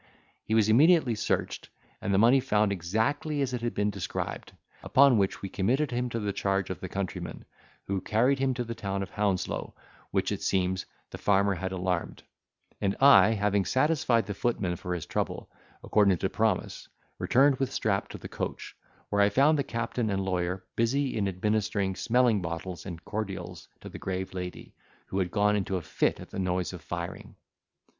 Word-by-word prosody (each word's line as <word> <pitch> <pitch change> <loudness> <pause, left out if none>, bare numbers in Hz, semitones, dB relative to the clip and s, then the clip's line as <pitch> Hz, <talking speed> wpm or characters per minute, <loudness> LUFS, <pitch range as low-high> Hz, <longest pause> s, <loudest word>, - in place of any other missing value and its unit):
He 110 - 0
was 110 -2 +4
immediately 140 +3 +5
searched, 105 - -2 0.3
and 100 - -2
the 95 - +3
money 120 +6 +6
found 105 -6 +1
exactly 115 - -1
as 130 -2 -3
it 125 - -2
had 120 0 -2
been 105 0 +1
described; 100 -3 -5 0.3
upon 135 -4 +5
which 95 0 -1
we - - -2
committed 130 +11 0
him 125 +1 -1
to 115 - -3
the 105 -2 -2
charge 95 -2 -1
of 95 - -5
the 95 - -6
countryman, 95 -1 -5 0.4
who 95 -1 -2
carried 125 +8 +2
him 130 -1 +1
to 125 - -2
the 115 0 -5
town 100 -3 -3
of - - -9
Hounslow, 100 -3 -2 0.3
which, - - 0
it - - -3
seems, 95 0 0 0.2
the - - -8
farmer 100 0 +3
had 95 +1 -4
alarmed; 90 -2 -2 0.6
and 100 0 +1
I, 135 -5 +7
having 100 -1 +1
satisfied 130 - +2
the 100 - -4
footman 100 -4 -1
for 90 +1 -4
his 85 - -5
trouble, - - -3 0.3
according 100 -4 +3
to 95 - -1
promise, 110 -4 -1 0.3
returned 135 +1 +4
with 135 0 -1
Strap 100 -6 0
to - - -7
the - - -8
coach, - - -5 0.3
where 100 0 +2
I 100 - +5
found 140 +8 +4
the - - +2
captain 115 -1 -2
and 95 -1 -1
lawyer 90 0 -2
busy 130 +4 +1
in 105 -3 0
administering 100 0 0
smelling 120 -2 +2
bottles 85 +2 -5
and 85 -3 -8
cordials 105 -2 -5
to - - -9
the - - -9
grave 95 0 -4
lady, 90 -1 -7 0.4
who 95 - -1
had 90 -2 0
gone 105 +2 +2
into 95 -2 -1
a - - -4
fit 75 - 0
at - - -11
the - - -5
noise 90 -1 -1
of 90 - -8
firing. 85 +2 -6
100 Hz, 185 wpm, -28 LUFS, 95-120 Hz, 0.6 s, I